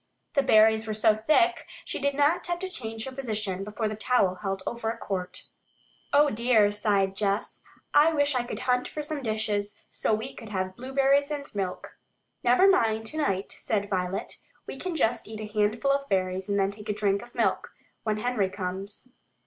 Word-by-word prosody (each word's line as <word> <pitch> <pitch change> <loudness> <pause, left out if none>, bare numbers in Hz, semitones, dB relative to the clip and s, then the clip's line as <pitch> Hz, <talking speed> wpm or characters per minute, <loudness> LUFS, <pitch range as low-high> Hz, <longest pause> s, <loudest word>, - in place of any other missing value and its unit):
The 280 - +4
berries 220 -3 +5
were 215 - -2
so 215 0 +5
thick 310 - +2 0.2
she - - -3
did 280 0 0
not 300 +6 +2
have 345 0 -1
to 375 +2 -4
change 225 -10 -4
her 265 - -5
position 215 -7 -2
before 210 +2 -3
the 215 - -3
towel 215 -4 +2
held 195 -2 -3
over 235 -1 -3
a 230 - -3
quart. 185 -2 -4 0.7
"Oh, 290 0 +5
dear," 220 -2 +3
sighed 200 -2 +1
Jess. 200 +1 -1 0.3
"I 300 +3 +6
wish 290 -2 +2
I 250 - +1
could 240 - -6
hunt 250 0 +1
for 300 - -5
some 300 -1 -3
dishes, 215 -3 -1
so - - -1
we 225 +5 -5
could 220 - -10
have 185 -2 -3
blueberries 275 +3 +2
and 290 -2 -4
milk." 190 -3 -4 0.4
"Never 250 +11 +5
mind 225 - +3
tonight," 220 -9 -1
said 205 -2 -2
Violet. 185 0 -2 0.3
"We - - -7
can 365 -2 -3
just 235 -6 +1
eat 220 0 -7
a 215 - -4
handful 215 +6 +2
of 275 0 -1
berries 185 0 0
and 200 - +1
then 195 0 +2
take 210 +1 -10
a - - +2
drink 200 -1 +1
of 240 - -14
milk, - - 0 0.3
when 215 -1 -1
Henry 215 -4 0
comes." 195 +6 -6
220 Hz, 190 wpm, -27 LUFS, 200-270 Hz, 0.7 s, I